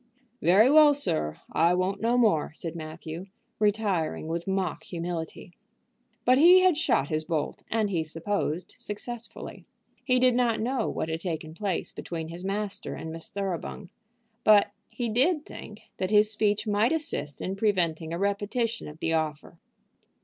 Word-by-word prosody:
"Very 195 +7 +6
well, 295 +1 +7
sir; 75 - -1
I 170 +3 +3
won't 185 +2 -1
no 235 +2 +2
more," 210 -11 +3
said 165 -1 -5
Matthew, 160 +2 -7 0.3
retiring 205 -7 0
with 170 +2 -3
mock 190 -1 -1
humility. 170 0 -5 0.7
But 255 +2 +5
he 360 +4 +8
had 370 -3 +4
shot 220 - +1
his 155 0 -1
bolt, 155 -3 -2
and 215 -2 0
he 165 -4 0
supposed 170 +1 -3
successfully. 230 +3 -6 0.4
He 255 -2 +2
did 250 0 +4
not 240 -2 +2
know 245 +1 -1
what - - -3
had 160 +1 -3
taken 160 -3 -4
place 190 0 -2
between 160 -2 -6
his 170 +2 -7
master 200 +1 -3
and 160 - -6
Miss 165 0 -7
Thoroughbung; 195 -1 -4 0.5
but 205 -1 +6 0.2
he 240 - -3
did 290 +8 +2
think 210 0 -10 0.2
that 185 - -1
his 210 0 +4
speech 210 0 +1
might 210 +3 +2
assist 300 - -2
in 190 - -3
preventing 170 -6 0
a 170 - -2
repetition 205 +4 -1
of 150 +2 -11
the 165 - 0
offer. 155 +1 -3
195 Hz, 155 wpm, -27 LUFS, 165-225 Hz, 0.7 s, he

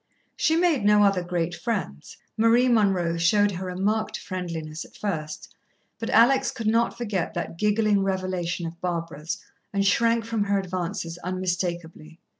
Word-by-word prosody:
She 320 - +2
made 330 - +2
no 210 0 +5
other 195 -2 +3
great 175 -1 -2
friends. 185 - -4 0.2
Marie 230 +3 +4
Munroe 195 -8 +2
showed 205 +5 +3
her 185 0 -5
a 180 - -5
marked 215 +2 0
friendliness 165 -4 -5
at - - -17
first, 155 -7 -4 0.5
but 225 - -4
Alex 240 +4 +5
could 225 - -6
not 230 +2 +2
forget 210 -7 -2
that 170 -1 -4
giggling 210 -1 +2
revelation 185 -3 -2
of 165 +1 -8
Barbara's, 165 -3 -3 0.3
and 200 -1 0
shrank 230 +3 +3
from 225 -3 -1
her 200 0 +1
advances 180 -2 -4
unmistakably. 175 -3 -4
190 Hz, 150 wpm, -25 LUFS, 170-215 Hz, 0.5 s, no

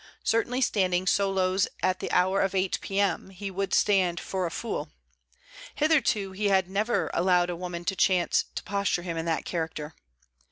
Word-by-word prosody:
Certainly 245 +3 +1
standing 185 -6 +1
solos 190 -1 +2 0.2
at 185 0 +1
the - - -4
hour 190 +2 +3
of 195 0 0
eight 190 0 0
P.M., 195 -1 -1
he 195 +1 -6
would 195 0 -3
stand 185 -4 +2
for 185 -2 -2
a - - -4
fool. 230 +7 -4 0.9
Hitherto 280 -11 +2
he 205 +2 -1
had 190 -2 +3
never 210 +5 0
allowed 180 0 +2
a - - -4
woman 175 0 -6
to 195 - 0
chance 180 -1 +2
to - - -4
posture 200 -3 -1
him 170 -2 -4
in 165 0 -3
that 165 -1 -1
character. 160 -2 -4
190 Hz, 170 wpm, -27 LUFS, 180-200 Hz, 0.9 s, hour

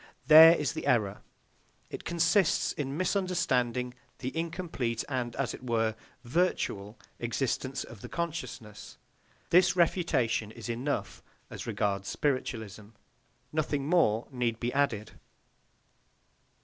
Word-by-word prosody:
There 160 +2 +10
is 150 -7 -1
the - - -5
error. 105 -5 +1 0.7
It - - -7
consists 170 +2 +2
in 140 0 -4
misunderstanding 155 - 0 0.2
the 130 +3 -5
incomplete 165 -8 -2
and, 125 -3 -3
as 135 - -2
it - - -9
were, 115 -2 +1 0.3
virtual 120 - -1 0.2
existence 130 +2 -2
of 115 -5 -12
the - - -8
consciousness. 145 -10 -6 0.5
This 180 +1 +5
refutation 165 - +1
is 115 +1 -9
enough 115 -6 -3 0.3
as - - -7
regards 100 -1 -1
spiritualism. 110 -7 -2 0.7
Nothing 145 -3 -1
more 120 -10 +2
need 120 -3 -1
be 120 0 -2
added. 115 -7 0
130 Hz, 110 wpm, -29 LUFS, 115-165 Hz, 0.7 s, There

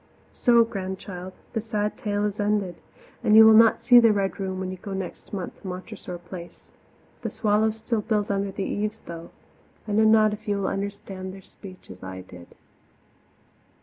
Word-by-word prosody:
So, 235 -2 +5
Grandchild, 190 -3 -6 0.2
the 225 - -1
sad 210 -1 -2
tale 205 -1 -1
is 210 0 -3
ended, 205 -3 0 0.5
and 215 - +4
you 220 0 +10
will 220 - +8
not 225 +1 +6
see 245 -2 +8
the 230 -2 +6
Red 200 -2 -1
Room 190 -1 -3
when 185 -1 -3
you 185 - -6
go 195 +2 -7
next 190 -2 -6
month 190 -3 -6
to 195 - -9
Montressor 180 -1 -7
Place. 175 0 -11 0.5
The - - -3
swallows 215 0 +1
still 225 0 -1
build 210 -1 0
under 200 0 -1
the 195 - -4
eaves, 215 +1 -3
though 170 0 -9 0.6
I - - -3
know 215 +2 +4
not 215 -1 +5
if 215 +1 -9
you 205 -1 +1
will 195 - -1
understand 195 -1 -5
their 195 - -13
speech 185 - -13
as 95 - -12
I 95 0 -7
did. 90 -1 -14
200 Hz, 185 wpm, -25 LUFS, 185-215 Hz, 0.6 s, you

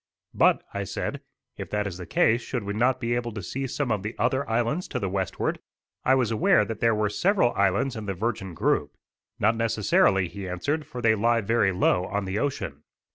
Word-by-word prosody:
"But," - - +3
I - - -2
said, - - -4 0.4
"if - - -6
that 105 0 -1
is 95 -2 -5
the 90 - -7
case 115 +2 +3
should 120 -1 -4
we 100 0 -3
not 125 +4 +2
be 120 -1 -1
able 120 -1 -2
to 105 -3 -6
see 135 +10 -3
some 135 -1 -2
of 105 -3 0
the 105 +3 -5
other 135 0 0
islands 120 +10 0
to - - -3
the 100 - -2
westward?" 95 -2 -2 0.4
I 130 - +4
was 125 -4 +1
aware 175 - +4
that 115 -2 -5
there 115 -1 +3
were 105 0 +1
several 175 - +2
islands 100 +7 +1
in 110 -2 -6
the 95 - -2
Virgin 95 -3 -3
Group. - - 0 0.4
"Not 110 +3 +2
necessarily," 105 -4 +2
he 95 +1 -7
answered, 145 - -2
"for 125 -1 -7
they 115 -1 +5
lie 115 +2 +2
very 105 -2 +2
low 90 0 +2
on 100 +1 -2
the 95 +2 -2
ocean." 130 - -3
110 Hz, 215 wpm, -26 LUFS, 100-120 Hz, 0.4 s, they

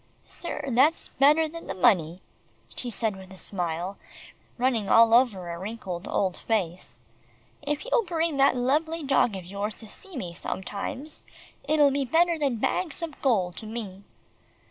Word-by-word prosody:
"Sir, 340 -4 -5
that's 270 +6 +3
better 300 +4 +4
than 335 +2 -9
the - - -4
money," 180 -4 +3 0.5
she 245 - -3
said 220 -2 -1
with 190 -1 -12
a 190 - -11
smile 180 0 -3 0.6
running 240 -5 +1
all 230 0 +6
over 230 -7 +4
her 170 0 -5
wrinkled 190 -3 -5
old 185 -3 0
face. 185 -6 -3 0.6
"If 295 +5 -3
you'll - - +2
bring 330 -3 0
that 275 -1 +5
lovely 305 +6 0
dog 270 -6 +2
of 185 -2 -7
yours 200 +3 -4
to 220 - -11
see 380 - -7
me 175 -8 -5
sometimes, 205 - -5 0.5
it'll 295 -2 +5
be 280 0 0
better 330 +5 +2
than 275 -5 +1
bags 335 +9 -1
of 315 -3 -6
gold 190 -10 +1
to 220 - -7
me." 205 -4 -6
235 Hz, 160 wpm, -27 LUFS, 190-295 Hz, 0.6 s, all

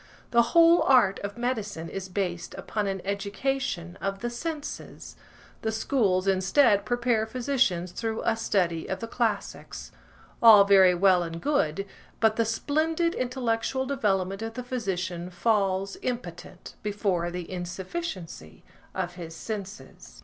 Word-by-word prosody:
The 235 - +6 0.2
whole 335 +1 +7
art 245 -8 +4
of 200 +2 -6
medicine 215 -9 -3
is 190 +2 -6
based 180 -3 -3
upon 210 -2 -3
an 195 -2 -3
education 200 -2 -2
of 195 0 -3
the 240 0 -2
senses; 300 +4 -6 0.5
the 220 - -1
schools, 210 -5 +1
instead, 200 +3 +3
prepare 240 -2 +1
physicians 235 -8 0
through 225 +2 -3
a 225 - +2
study 180 -7 0
of 190 - -2
the 230 - -5
classics. 225 -3 -3 0.5
All 220 -3 +9
very 190 -2 +6
well 185 0 +4
and 165 -1 -5
good, 195 - 0 0.3
but 220 -1 +3
the 230 - +1
splendid 315 +8 0
intellectual 250 0 -1
development 195 -7 0
of 225 0 -5
the 250 - -4
physician 185 -8 -3
falls, 195 0 0
impotent, 185 -7 -6
before 200 -4 -1
the 175 -1 -6
insufficiency 180 - -6 0.3
of 180 -2 -2
his 165 -2 -8
senses. 205 +1 -8
200 Hz, 135 wpm, -27 LUFS, 185-240 Hz, 0.5 s, All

